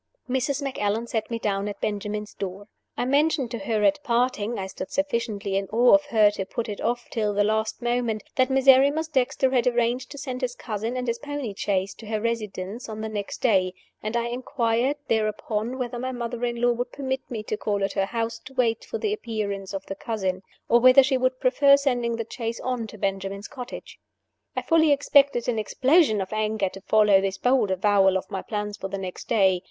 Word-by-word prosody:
Mrs. 265 +2 -1
Macallan 225 -4 -1
set 225 -2 -3
me 230 - -2
down 200 -2 -1
at 205 -1 -6
Benjamin's 210 0 -3
door. 195 +1 -6 0.3
I - - 0
mentioned 280 -1 +2
to 235 - -4
her 210 +1 -1
at 290 +7 +3
parting 240 -3 0
I 190 - -3
stood 190 0 -7
sufficiently 230 -8 -1
in 195 0 0
awe 240 +4 +4
of 295 0 +5
her 215 -5 +5
to 205 -2 -3
put 235 - -3
it 205 -2 -5
off 240 +1 -1
till 210 -3 -1
the 205 - +3
last 220 +3 -1
moment 240 -3 0
that 255 0 +3
Miserrimus 270 +4 +5
Dexter 265 -1 +1
had 250 -2 +2
arranged 240 +1 +1
to 285 - -9
send 260 -2 -5
his 250 -1 -2
cousin 225 +2 -4
and 250 0 -3
his 235 0 -1
pony 290 -6 -4
chaise 195 -1 -1
to 220 - -12
her 215 0 -1
residence 215 -1 -4
on 215 0 -6
the 220 - -3
next 205 -2 -5
day; 185 -6 +3 0.3
and 215 +3 -2
I 235 - 0
inquired 245 +1 0
thereupon 220 +2 -1
whether 245 -2 -3
my 260 +1 -3
mother 240 -1 -4
in 240 -1 -3
law 245 0 +3
would 245 +1 -3
permit 265 -1 -3
me 220 -3 -4
to 215 - -2
call 205 -1 -1
at 195 - -1
her 195 - +1
house 230 +1 -3
to 265 0 -12
wait 230 -3 +1
for - - -5
the 425 -1 -1
appearance 205 - -4
of 195 -1 -5
the - - -5
cousin, 190 -3 -3 0.3
or 235 - +5
whether 255 +2 +8
she 265 +1 +1
would 255 0 0
prefer 280 +2 +5
sending 245 -4 0
the 230 -1 -3
chaise 230 -2 -4
on 250 -3 -2
to 215 - -11
Benjamin's 195 +1 -3
cottage. 250 -4 -9 0.6
I - - -2
fully 320 -2 +4
expected 280 -3 +3
an 235 -3 0
explosion 260 - +3
of 190 +2 -5
anger 215 -2 0
to 195 - -11
follow 210 -1 +4
this 195 0 -2
bold 250 -4 +2
avowal 190 0 +3
of 190 - -7
my 190 -2 -3
plans 210 -2 -4
for 195 - -4
the 195 +1 -4
next 185 -2 -7
day. 190 -5 +3
230 Hz, 210 wpm, -25 LUFS, 205-255 Hz, 0.6 s, whether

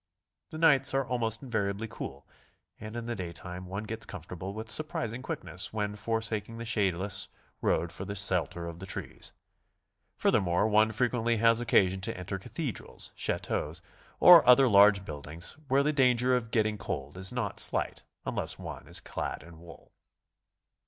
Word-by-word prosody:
The 155 - -7
nights 140 -5 +4
are 135 0 +2
almost 115 -1 -1
invariably 110 -3 -2
cool, - - -8 0.5
and 110 +1 -8
in 120 -1 -4
the 120 0 -3
day 90 -4 -5
time 90 +1 -8
one 100 +3 -4
gets 110 +1 -6
comfortable 90 +1 -7
with 110 +2 -6
surprising 120 -3 -3
quickness - - -4
when 105 -1 -2
for 110 +2 -1
saking 110 0 -2
the 115 - -6
shadeless 100 -4 0 0.3
road 85 - +1
for 95 - -6
the 100 +1 -5
shelter 90 -3 0
of 85 0 -7
the 95 - -8
trees. - - -7 0.9
Fur - - +3
thermore, 90 +2 +2
one 110 +1 +4
frequently 120 0 +1
'has 115 +1 +4
occasion 95 -5 +3
to 95 - -1
enter 95 +2 -4
'Cathedrals, 135 - -6
chateaux 75 - -2 0.5
or 175 -2 +10
other 130 +1 +8
large 100 -2 +6
buildings 75 +2 -6
where 135 +1 +3
the 150 +1 +1
danger 125 -2 +4
of 120 -2 -2
get 115 -1 +3
ting 105 -1 -3
cold 70 -5 -5
is 95 +1 -2
not 120 -5 -2
slight - - 0 0.2
unless - - -2
one - - -8
is - - -3
clad - - -5
in 85 0 -14
wool. 85 0 -14
105 Hz, 170 wpm, -30 LUFS, 95-120 Hz, 0.9 s, or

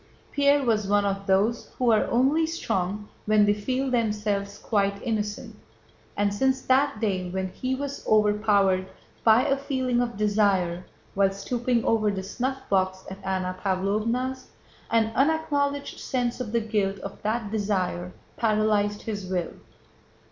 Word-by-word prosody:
Pierre 285 0 +3
was 215 -5 +1
one 205 0 +3
of 195 0 -2
those 205 +5 +2
who 245 -2 +3
are 215 - +3
only 275 +7 +3
strong 205 - -2 0.2
when 215 -1 +5
they 205 - +4
feel 255 +6 -2
themselves 210 -4 -1
quite 200 -2 0
innocent, 210 -3 -3 0.6
and 205 0 +1
since 265 +5 +1
that 265 -2 +2
day 190 -5 -1
when 190 +1 -2
he 255 +7 -3
was 280 +1 -5
overpowered 205 -3 +3 0.4
by 225 +2 +5
a 275 - +3
feeling 260 -3 -1
of 235 -4 -3
desire 200 -4 +1 0.3
while 195 0 +3
stooping 235 +4 -1
over 215 -2 +2
the 195 -2 -3
snuffbox 195 -5 -1
at 195 +1 -9
Anna 185 -1 -2
Pávlovna's, 215 +7 -1 0.4
an 225 -1 +2
unacknowledged 285 0 0
sense 245 -1 -2
of 225 -4 -4
the 235 0 +1
guilt 205 -3 -1
of 195 - -8
that 215 0 -2
desire 185 -4 -1 0.3
paralyzed 210 -2 +1
his 205 -4 -4
will. 180 -2 -2
215 Hz, 140 wpm, -26 LUFS, 200-250 Hz, 0.6 s, when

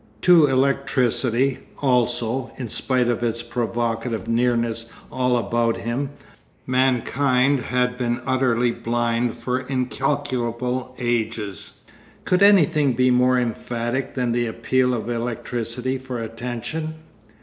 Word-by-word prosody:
To 170 -4 +6
electricity 130 -1 +1 0.2
also, 125 -1 0
in 125 -3 -5
spite 125 +2 0
of 120 -1 0
its 115 0 -1
provocative 115 -2 -2
nearness 115 -1 0 0.2
all 125 -1 +1
about 115 -1 0
him, 125 +4 -2 0.6
mankind 130 +1 +2
had 125 +1 -1
been 120 0 0
utterly 125 -2 +2
blind 120 0 -1
for 125 +2 -1
incalculable 130 -2 -2
ages. 115 -4 -2 0.5
Could 180 +1 +2
anything 160 -9 +5
be 125 +1 +3
more 125 +1 +4
emphatic 120 +2 -3
than 125 -2 0
the 120 0 0
appeal 125 +3 +1
of 115 - -4
electricity 120 +2 -3
for 130 -2 -5
attention? 120 +8 -5
125 Hz, 110 wpm, -22 LUFS, 115-130 Hz, 0.6 s, To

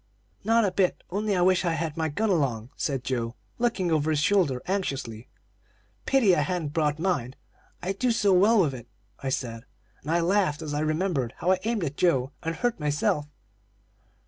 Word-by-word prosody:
"'Not 225 0 +3
a 195 - +1
bit, 185 -1 0
only 205 +1 0
I 180 - +1
wish 185 +1 +3
I 170 -2 +1
had 160 -1 -2
my 160 -1 -1
gun 210 +8 0
along,' 130 - 0
said 135 -4 -2
Joe, 120 -2 -2 0.2
looking 220 -8 0
over 155 -1 +1
his 155 -2 +1
shoulder 155 -6 +2
anxiously. 135 - -3 0.8
"'Pity 235 -9 +4
I 150 - +2
hadn't 155 -1 -2
brought 150 -2 +1
mine 155 -8 -1 0.5
I 185 - -1
do 245 +6 0
so 205 -4 +3
well 205 +5 +5
with 155 -7 +2
it,' 120 -2 -9 0.3
I 135 - -2
said, 115 -3 -3 0.4
and 145 - -8
I 170 +1 +3
laughed 170 -3 +1
as 150 -2 -4
I 145 - -1
remembered 155 -5 -1
how 180 - +1
I 185 - +2
aimed 225 -4 0
at 145 -2 -4
Joe 135 -7 +2
and 165 -1 -3
hurt 240 +2 -1
myself. 150 0 0
165 Hz, 190 wpm, -26 LUFS, 140-190 Hz, 0.8 s, well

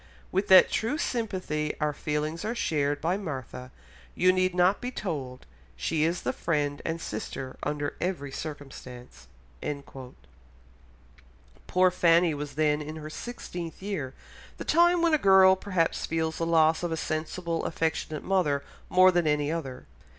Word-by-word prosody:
"With 190 +2 0
what 190 -1 +8
true 235 +7 0
sympathy 185 - -2
our 150 -1 0
feelings 150 +3 -3
are 220 +3 -2
shared 145 -8 0
by 175 +4 +1
Martha 130 - -6 0.5
you 185 +1 +4
need 185 -1 +1
not 180 +3 +3
be 245 - -3
told; 145 - -5 0.3
she 150 - 0
is 170 +2 -1
the - - -1
friend 145 -3 -1
and 165 0 -2
sister 130 +1 -5
under 145 -1 -2
every 170 -7 -2
circumstance." 135 -4 -9 2.4
Poor 185 0 +4
Fanny 170 -1 +4
was 145 0 -6
then 150 -1 +2
in 155 +1 -6
her 155 -1 -7
sixteenth 175 -5 -7
year, 155 -11 -4 0.4
the - - -6
time 345 0 +4
when 335 -2 +3
a 310 - +4
girl 190 -3 +7
perhaps 185 -4 -1
feels 160 0 -1
the 165 - 0
loss 160 -1 +4
of 175 -1 -2
a 160 - -1
sensible, 165 +2 -3
affectionate 160 -2 -2
mother 150 -8 +1 0.3
more 185 0 +6
than 175 -3 +1
any 150 0 +1
other. 135 -6 -5
165 Hz, 150 wpm, -28 LUFS, 150-185 Hz, 2.4 s, what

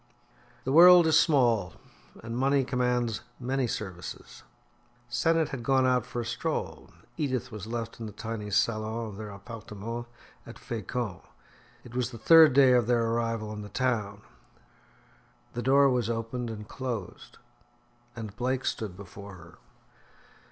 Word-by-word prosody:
The 130 - -2
world 175 +3 +9
is 160 0 +5
small, 120 - +2 0.5
and 115 0 -5
money 135 +2 +2
commands 125 -3 0 0.2
many 130 0 -1
services. 95 -6 -7 0.7
Sennett 160 +6 +1
had 135 -4 -5
gone 130 +2 +2
out 125 -2 +2
for 120 - -3
a - - -6
stroll; 120 - -4 0.3
Edith 130 -4 -2
was 105 -1 -7
left 115 0 -5
in 115 - -5
the - - -7
tiny 110 0 -6
salon 110 +2 0
of 100 - -10
their 110 -1 -7
appartement 110 +2 -7 0.4
at - - -10
Fecamp. 115 -3 -4 0.6
It 120 - -13
was 125 -1 -1
the 120 - -9
third 160 +3 +7
day 135 -1 +6
of 120 -3 +3
their 120 -1 +2
arrival 115 -2 -2
in 105 - -6
the 105 - -9
town. 105 -4 -2 1.3
The 120 - -3
door 140 +3 +5
was 125 -3 +1
opened 115 +1 -3
and 105 -2 -7
closed, 120 -8 -6 0.8
and 110 -3 -7
Blake 130 +2 -1
stood 100 -5 -3
before 100 0 -10
her. 85 -1 -15
115 Hz, 145 wpm, -28 LUFS, 110-130 Hz, 1.3 s, world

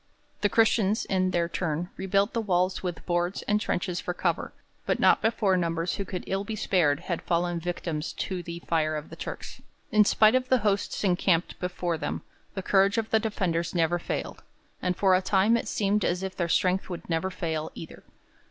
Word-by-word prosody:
The 205 - +3
Christians, 220 -2 +3
in 185 -1 +1
their 175 -2 +1
turn, 170 0 -2
rebuilt 195 +1 +1
the 230 - 0
walls 185 -2 +1
with 180 -3 -5
boards 175 +1 -1
and 210 0 +1
trenches 180 -3 -1
for 180 - -4
cover, - - -1 0.4
but - - +1
not - - +5
before 220 -4 +2
numbers 170 -1 -1
who 200 - -3
could 180 -1 -5
ill 195 +1 -1
be 215 +2 -4
spared 165 -8 +2
had 170 -3 -3
fallen 175 0 0
victims 165 -2 -3
to 185 -2 -3
the 170 0 -7
fire 155 -2 +1
of 150 0 -6
the - - -7
Turks. - - -7 0.3
In 215 0 +6
spite 215 +2 +5
of 255 0 +1
the 260 - +5
hosts 200 0 0
encamped 180 -2 +1
before 180 -2 -2
them, - - -3 0.3
the 190 - -3
courage 195 +3 +3
of 225 -1 -1
the 220 - +4
defenders 180 -6 -1
never 170 +1 +2
failed, - - -4 0.4
and 180 -1 -1
for 190 -2 +4
a 185 - +4
time 195 +4 +3
it 235 - -1
seemed 205 0 +1
as 180 +2 0
if 190 -1 -4
their 170 -2 -1
strength 185 +3 +1
would 175 -2 -6
never 165 +2 0
fail 160 -4 -3
either. 165 - -10
185 Hz, 200 wpm, -27 LUFS, 170-200 Hz, 0.4 s, In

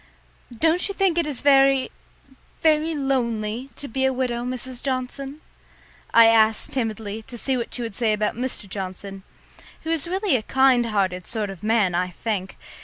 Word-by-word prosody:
"Don't 325 +9 +2
you 400 - -5
think 385 -4 +2
it 335 - 0
is 285 -5 -2
very 275 -2 +4 0.7
very 315 0 +2
lonely 245 -3 -1
to 285 - -5
be 265 +2 -2
a 265 - +3
widow, 250 -2 -2
Mrs. 255 0 -5
Johnson?" 270 +2 -4 0.7
I 230 0 +8
asked 220 -1 +3
timidly 220 -3 -3
to 240 +2 -9
see 265 +3 +1
what 240 -2 -3
she 245 - -3
would 230 - -5
say 225 +1 +1
about 210 0 0
Mr. 245 -3 -3
Johnson, 195 0 -6 0.6
who 320 - -2
is 325 -1 +1
really 380 -2 +1
a 240 - +1
kind 260 0 +3
hearted 190 -4 -1
sort 215 -4 -2
of 190 - -11
man, 215 -4 +2
I 180 +1 0
think. 190 0 -4
245 Hz, 175 wpm, -23 LUFS, 215-275 Hz, 0.7 s, I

